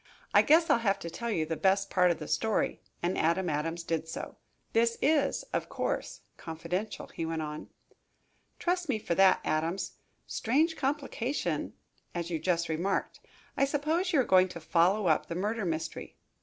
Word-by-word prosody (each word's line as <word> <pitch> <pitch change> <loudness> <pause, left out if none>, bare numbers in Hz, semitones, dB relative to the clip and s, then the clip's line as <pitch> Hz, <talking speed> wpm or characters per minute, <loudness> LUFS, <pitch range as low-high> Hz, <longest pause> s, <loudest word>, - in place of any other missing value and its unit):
I - - +8
guess 325 +2 +5
I'll - - +4
have 200 -4 +1
to 170 - -7
tell 235 +6 -4
you 165 -8 0
the 160 +1 -2
best 195 +3 +2
part 180 -1 +4
of 170 - +1
the 150 - -7
story," 205 +8 0 0.2
and 175 +2 +1
Adam 170 +2 +1
Adams 165 +3 -2
did 165 -1 -2
so. 160 - -6 0.4
"This 230 0 +3
is, 295 - +2
of - - -1
course, - - -3 0.2
confidential," 175 +6 -4
he - - -4
went 160 -1 -2
on. 150 0 -6 0.9
"Trust 355 -2 -1
me 245 - +2
for 210 - -2
that, 190 +1 +5
Adams. 165 +5 -1 0.3
Strange 310 +8 +1
complication, 275 -2 -2 0.4
as 170 0 -3
you 165 - -1
just 175 -1 0
remarked. 175 +5 -1 0.4
I - - +2
suppose 315 +6 0
you 310 - +3
are - - +5
going 185 -4 +5
to 175 -2 -8
follow 180 +5 +2
up 160 -3 +2
the 165 - -4
murder 210 +3 -1
mystery. 160 -2 -4
185 Hz, 175 wpm, -30 LUFS, 165-235 Hz, 0.9 s, I